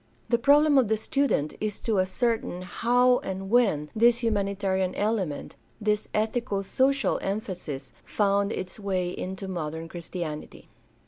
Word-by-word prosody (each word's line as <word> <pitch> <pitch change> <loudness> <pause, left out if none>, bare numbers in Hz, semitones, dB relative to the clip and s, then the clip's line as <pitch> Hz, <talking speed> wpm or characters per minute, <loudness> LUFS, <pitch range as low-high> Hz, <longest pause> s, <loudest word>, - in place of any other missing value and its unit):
The 235 - +3
problem 290 +2 +5
of 250 - +2
the 220 +1 +1
student 220 - 0
is 210 -1 -2
to 220 -4 +1
ascertain 220 0 0
how 245 +6 +3
and 190 +1 -5
when 195 -12 +3
this 235 +2 +4
humanitarian 195 -3 0
element, 200 -8 -2 0.2
this 210 -1 0
ethico 215 -2 -1
social 270 +6 +2
emphasis, 175 - -4
found 200 0 +1
its 185 +1 -5
way 185 -3 -1
into 190 +1 -5
modern 165 -3 -4
Christianity. 170 -2 -7
200 Hz, 130 wpm, -27 LUFS, 185-235 Hz, 0.2 s, problem